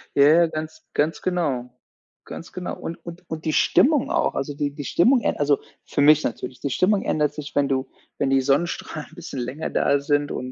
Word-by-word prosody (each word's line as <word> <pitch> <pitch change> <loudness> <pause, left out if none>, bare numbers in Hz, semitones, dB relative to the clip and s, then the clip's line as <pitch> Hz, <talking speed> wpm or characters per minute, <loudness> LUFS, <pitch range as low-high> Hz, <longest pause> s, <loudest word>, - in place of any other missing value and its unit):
Ja, 140 - +6
ja, 165 +3 +6
ganz 155 0 -6
ganz 155 +2 0
genau, 145 -9 -1 0.6
ganz 165 - -9
genau. 180 -1 -5
Und 165 - -6
und 170 +1 -9
und 160 0 -6
die 155 - 0
Stimmung 290 - +3
auch, - - +1
also, 140 +2 -3
die 145 0 -2
die 145 0 -7
Stimmung 245 - +3
äh - - 0
also, 145 -1 +2 0.3
für - - -1
mich 150 +1 +6
natürlich, 125 +1 -4
die 140 - -3
Stimmung 195 - +2
ändert 150 -1 0
sich, 150 -1 -8
wenn 140 -1 +3
du 130 -1 -1 0.3
wenn 140 - 0
die 135 0 +3
Sonnenstrahlen 150 +2 -1
'n - - -16
bisschen 135 - -7
länger 125 +6 -4
da 140 0 +2
sind 145 0 0
und 130 0 -5
150 Hz, 210 wpm, -23 LUFS, 140-165 Hz, 0.6 s, Ja